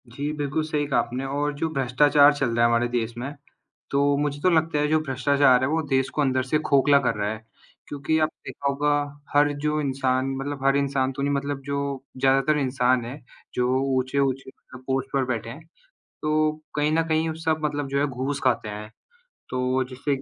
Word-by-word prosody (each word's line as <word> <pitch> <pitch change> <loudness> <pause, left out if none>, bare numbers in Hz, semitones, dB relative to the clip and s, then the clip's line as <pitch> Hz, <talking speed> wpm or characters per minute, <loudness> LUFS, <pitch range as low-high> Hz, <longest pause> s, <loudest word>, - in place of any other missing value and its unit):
जी, 140 +5 -4
बिल्कुल 150 +1 -2
सही 150 -1 -1
कहा 140 - +2
आपने 125 +3 -3
और 145 +2 -1
जो 155 +3 -1
भ्रष्टाचार 145 +2 +4
चल 135 -3 -1
रहा 115 - +3
है - - +6
हमारे 120 +1 +2
देश 120 -1 -2
में, 135 +4 -5 0.6
तो 140 0 +2
मुझे 145 0 -2
तो 185 - +3
लगता 160 -2 +2
है 150 0 +1
जो 155 +1 +3
भ्रष्टाचार 135 -2 +3
है - - +2
वो 160 +2 +1
देश 130 -1 +1
को - - 0
अंदर 130 -2 +1
से 135 +4 0
खोखला 140 -1 +4
कर - - 0
रहा 105 0 -1
है, 110 0 -9 0.4
क्योंकि 145 +2 -1
आपने 155 0 -2
देखा 140 - -3
होगा 145 +1 0 0.4
हर 145 0 +4
जो 150 0 0
इंसान 130 -2 0
मतलब 135 0 -5
हर 135 0 +4
इंसान 135 -1 0
तो 140 - -5
नहीं 140 +1 +1
मतलब 140 0 -2
जो 140 -1 -3
ज़्यादातर 135 +3 +3
इंसान 130 -2 +1
है, 130 +5 -7 0.3
जो 125 +1 +1 0.2
ऊँचे-ऊँची 130 0 -1
मतलब 130 -1 -15
पोस्ट 135 0 -1
पर 135 -1 +1
बैठे 115 -2 -3
हैं, 150 +7 -10 0.6
तो 155 0 +2 0.3
कहीं 150 0 +2
न 165 +1 +3
कहीं 160 0 +1
उस 160 +1 -8
सब 160 -1 +1
मतलब 145 -1 -2
जो 140 +1 -1
है 145 - +2
घूस 135 +1 -3
खाते 120 -4 +1
हैं। 105 0 -7 0.6
तो 130 +1 0
जिससे 130 +3 -3
140 Hz, 205 wpm, -24 LUFS, 130-145 Hz, 0.6 s, है